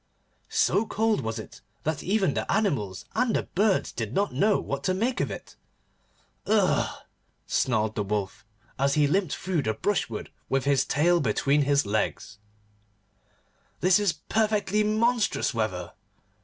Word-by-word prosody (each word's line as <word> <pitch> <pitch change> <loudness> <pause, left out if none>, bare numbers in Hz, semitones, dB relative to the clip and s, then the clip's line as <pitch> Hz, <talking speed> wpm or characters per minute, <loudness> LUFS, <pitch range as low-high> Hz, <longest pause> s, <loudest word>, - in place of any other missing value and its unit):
So 215 +2 +2
cold 220 -5 +1
was 110 -1 -3
it 110 - -9 0.2
that 155 -1 -2
even 195 0 +1
the - - -2
animals 125 - 0
and 250 -2 +1
the - - +1
birds 200 +1 +1
did 110 +1 -5
not 200 -6 +1
know 200 +11 +3
what - - -4
to 185 - +1
make 240 +7 0
of - - -1
it. - - -8 0.9
'Ugh!' 205 -3 +1 0.4
snarled 110 -3 +1
the 105 - -2
Wolf, 100 -1 -3 0.4
as 140 +1 +2
he 150 -1 +4
limped 180 +2 +1
through 180 -5 -1
the 110 -4 -1
brushwood 115 - -2 0.2
with 135 0 0
his 140 -1 +3
tail 170 +5 +3
between 140 +4 +2
his 140 -2 +2
legs, 105 0 -2 1.4
'this 185 +3 +5
is 205 -5 +2
perfectly 210 +4 0
monstrous 220 +2 +1
weather. 95 -7 -3
155 Hz, 145 wpm, -26 LUFS, -, 1.4 s, this